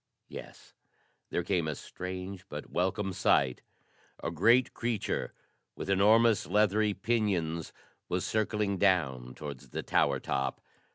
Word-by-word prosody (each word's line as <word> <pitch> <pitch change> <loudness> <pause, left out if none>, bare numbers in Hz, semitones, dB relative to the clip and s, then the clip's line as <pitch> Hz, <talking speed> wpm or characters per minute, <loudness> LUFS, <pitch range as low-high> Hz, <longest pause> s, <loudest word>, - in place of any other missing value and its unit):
Yes, - - -10 0.6
there 85 - -1
came 85 -4 0
a 75 - -2
strange, 95 +3 -7
but 75 0 -7
welcome 95 +2 0
sight: 65 -6 +2 0.6
a 85 - -1
great 115 +9 +4
creature 115 -3 -2 0.4
with 100 - -3
enormous, 110 +3 +4
leathery 105 0 +3
pinions 95 -7 0 0.4
was 90 0 -1
circling 105 -2 0
down 65 -10 +1
towards 70 -3 -8
the - - -4
tower - - +2
top! 65 0 -2
95 Hz, 120 wpm, -30 LUFS, 80-105 Hz, 0.6 s, great